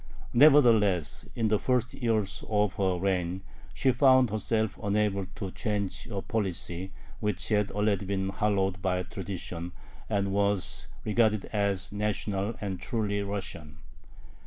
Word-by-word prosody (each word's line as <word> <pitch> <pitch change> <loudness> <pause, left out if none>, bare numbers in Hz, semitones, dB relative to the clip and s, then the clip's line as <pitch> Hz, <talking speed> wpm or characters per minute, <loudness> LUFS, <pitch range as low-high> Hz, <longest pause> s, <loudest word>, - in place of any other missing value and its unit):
Nevertheless 115 - +5
in 115 -2 +1
the 105 -1 +2
first 125 -1 0
years 105 -6 -1
of 105 -3 +2
her 95 -2 +1
reign 90 0 -1 0.3
she 130 - +2
found 130 -2 +5
herself 110 0 -1
unable 100 -1 0
to 95 -2 -5
change 105 -4 -3
a 100 -4 -4
policy 95 -3 -3 0.3
which 105 -3 -2
had 105 -2 +2
already 105 -1 0
been 95 -1 -1
hallowed 95 -2 0
by 90 -1 0
tradition, 90 -2 -6 0.4
and 100 -2 0
was 100 -2 0 0.2
regarded 110 -1 +2
as 100 -2 0
"national" 105 0 -1
and 95 -3 -4
truly 100 -1 -1
Russian. 90 -6 -5
100 Hz, 130 wpm, -29 LUFS, 95-110 Hz, 0.4 s, Nevertheless